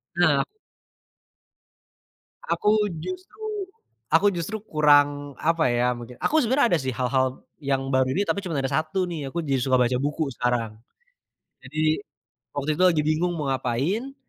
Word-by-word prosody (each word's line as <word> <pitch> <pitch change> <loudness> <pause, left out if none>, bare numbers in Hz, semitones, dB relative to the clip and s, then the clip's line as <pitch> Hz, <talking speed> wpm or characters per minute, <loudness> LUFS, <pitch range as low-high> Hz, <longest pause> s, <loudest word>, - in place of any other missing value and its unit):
Nah. 155 -6 +4 2.0
Aku 210 - +1 0.3
justru 370 +3 -7 0.7
aku 190 +5 +5
justru 185 +5 -3
kurang 145 - +3
apa 165 -1 +3
ya, 120 +1 +2
mungkin 120 +1 -9
aku 315 - +3
sebenarnya 260 +1 +3
ada 160 - 0
sih 130 -1 -2
hal-hal 130 +1 0 0.2
yang 135 -1 -1
baru 130 0 +3
ini 195 - +1
tapi 200 - -1
cuma 180 -6 -4
ada 135 -1 -1
1 160 +4 0
nih 150 -5 -4
aku 170 +4 -3
jadi 135 -3 0
suka 130 +1 +2
baca 125 +1 +2
buku 150 +2 -1
sekarang. 115 -3 -1 0.8
Jadi, 155 +6 0 0.5
waktu 145 +1 -2
itu 185 - +2
lagi 155 -3 +2
bingung 160 +3 +1
mau 145 -3 -2
ngapain, 140 - -1
145 Hz, 145 wpm, -25 LUFS, 130-175 Hz, 2.0 s, aku